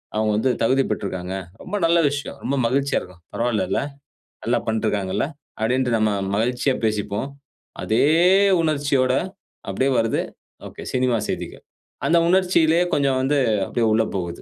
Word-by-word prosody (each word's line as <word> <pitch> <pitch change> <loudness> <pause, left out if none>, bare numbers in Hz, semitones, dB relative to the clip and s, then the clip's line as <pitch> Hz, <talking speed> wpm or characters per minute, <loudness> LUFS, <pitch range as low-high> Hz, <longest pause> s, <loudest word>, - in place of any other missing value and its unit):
அவங்க 110 0 +1
வந்து 130 +4 +2
தகுதி 135 +4 +3
பெற்றிருக்காங்க." 95 -2 -4 0.3
ரொம்ப 195 - -5
நல்ல 170 +1 +4
விஷயம். 140 0 -5
ரொம்ப 140 +1 -1
மகிழ்ச்சியா 135 +3 +1
இருக்கும். 90 -1 -14
பரவாயில்லல. 115 -2 0 0.6
நல்லா 120 0 +2
பண்ட்ருக்காங்கல்ல. 105 -2 -1 0.3
அப்படின்டு 125 +3 +1
நம்ம 110 -1 +2 0.3
மகிழ்ச்சியா 125 +4 0
பேசிப்போம். 105 +2 -1 0.6
அதே 110 - +2 0.6
உணர்ச்சியோட 140 -4 +1 0.6
அப்படியே 130 +8 0
வருது. 115 0 0 0.7
சினிமா 125 -2 +2
செய்திகள். - - -5 0.4
அந்த 170 - +4
உணர்ச்சியிலேயே 175 -2 +3
கொஞ்சம் 135 -2 +2
வந்து 145 +2 +1 0.3
அப்படியே 115 +3 -1
உள்ள 115 - +3
போகுது. 85 -2 -4
125 Hz, 125 wpm, -22 LUFS, 110-140 Hz, 0.7 s, நல்ல